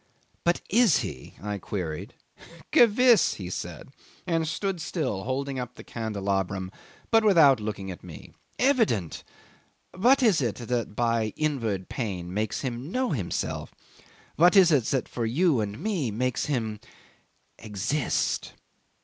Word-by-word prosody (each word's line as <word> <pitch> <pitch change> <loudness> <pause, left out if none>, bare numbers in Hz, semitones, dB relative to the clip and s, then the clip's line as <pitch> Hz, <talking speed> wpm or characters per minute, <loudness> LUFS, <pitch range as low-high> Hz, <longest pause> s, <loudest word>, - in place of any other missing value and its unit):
"But 175 0 +1
is 225 -6 +4
he?" 75 - -7
I 105 -1 -3
queried. 85 -6 -5 0.6
'"Gewiss," 235 -3 +5
he 90 -3 -7
said, 85 - -6 0.4
and 165 -3 0
stood 180 +2 -2
still 135 - -3
holding 135 +1 -2
up 125 -1 -6
the - - -11
candelabrum, 100 -4 -2 0.4
but 225 -1 +5
without 160 - +6
looking 105 -3 -4
at 90 - -10
me. 85 -5 -11 0.2
"Evident! 225 - +1 0.7
What 255 +8 +4
is 205 -10 +4
it 120 -5 -1
that 120 -3 -3
by 115 -2 0
inward 115 -11 -1
pain 90 -7 -4
makes 105 +1 -2
him 130 +3 -4
know 255 -2 0
himself? 105 - -3 0.6
What 175 +5 +6
is 185 -4 +7
it 135 -7 +3
that 130 0 -1
for 115 -2 -3
you 150 +3 +2
and 105 0 -4
me 175 - -1
makes 125 +7 -1
him 110 -7 -2 0.8
exist?" 110 +7 -1
125 Hz, 135 wpm, -26 LUFS, 105-170 Hz, 0.8 s, is